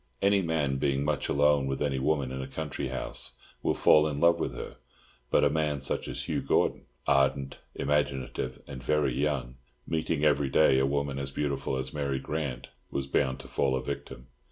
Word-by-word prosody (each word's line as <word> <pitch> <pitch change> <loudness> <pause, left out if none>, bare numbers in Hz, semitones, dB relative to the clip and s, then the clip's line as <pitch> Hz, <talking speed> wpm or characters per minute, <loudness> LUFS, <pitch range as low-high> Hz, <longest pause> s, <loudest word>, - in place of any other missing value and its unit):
Any 100 0 +4
man, 75 -6 0
being 70 0 +1
much - - -1
alone 70 -1 +3
with 70 0 -2
any 70 -2 0
woman 70 -1 +1
in 65 0 -4
a 65 - -5
country 75 +1 -4
house, - - -3 0.3
will - - +1
fall 75 0 +5
in 75 -2 -3
love 85 +1 +5
with - - -2
her; - - -7 0.5
but - - +4
a - - +5
man 75 -2 0
such 65 - -3
as - - -4
Hugh - - -1
Gordon, - - +1 0.2
ardent, 70 0 +2 0.2
imaginative, 70 -3 -1
and 65 -3 -8
very 75 0 +1
young, 65 -3 -1 0.3
meeting 80 -1 0
every 70 -2 +3
day 65 -1 +5
a 65 - +3
woman 70 -1 -1
as 70 0 -3
beautiful 70 -1 -2
as 65 0 -4
Mary 70 -3 -1
Grant, 70 -4 -4 0.2
was 70 - -2
bound 65 -1 0
to - - -12
fall 65 -1 +1
a 65 - -2
victim. 70 -3 -6
70 Hz, 190 wpm, -29 LUFS, 65-75 Hz, 0.5 s, fall